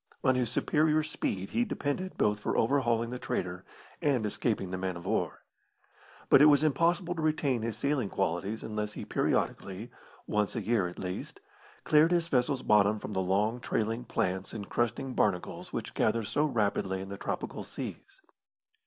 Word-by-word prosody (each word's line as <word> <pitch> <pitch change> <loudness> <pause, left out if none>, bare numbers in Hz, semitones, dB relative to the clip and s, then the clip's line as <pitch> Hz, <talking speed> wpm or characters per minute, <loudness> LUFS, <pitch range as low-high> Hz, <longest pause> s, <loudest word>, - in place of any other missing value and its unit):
On 130 - +4
his 125 -3 0
superior 155 +5 +2
speed 100 -10 -3
he 240 - +2
depended 185 -2 -3
both 105 0 +2
for - - -1
overhauling 120 -2 +2
the 125 - -4
trader 90 -4 -3 0.4
and 130 -7 +2
escaping 105 -3 -1
the 95 - -2
man 95 -1 -2
of 85 - -10
war. - - -1 0.8
But - - +7
it 150 - +9
was 145 0 +5
impossible 170 +4 +2
to 165 - -4
retain 150 -6 +1
his 110 -1 -3
sailing 140 -4 0
qualities 95 +4 -1
unless 105 -1 -3
he - - -6
periodically 100 +5 -1 0.3
once 105 -1 0
a - - -1
year, 110 -5 +2
at 90 - -8
the - - -7
least 90 0 -5 0.4
cleared 155 +2 +5
his 170 -1 +1
vessel's 130 0 +1
bottom 105 0 +4
from 105 - -6
the 95 - +1
long, 105 +6 +1
trailing 115 0 -1
plants 95 +1 -2
and 105 -3 -6
crusting 120 +2 -1
barnacles 90 -6 -1
which - - -4
gather 115 +1 +1
so 145 +8 +1
rapidly 100 -7 0
in 95 +1 -7
the 100 - -6
tropical - - -4
seas. 390 -1 -8
115 Hz, 175 wpm, -30 LUFS, 100-145 Hz, 0.8 s, it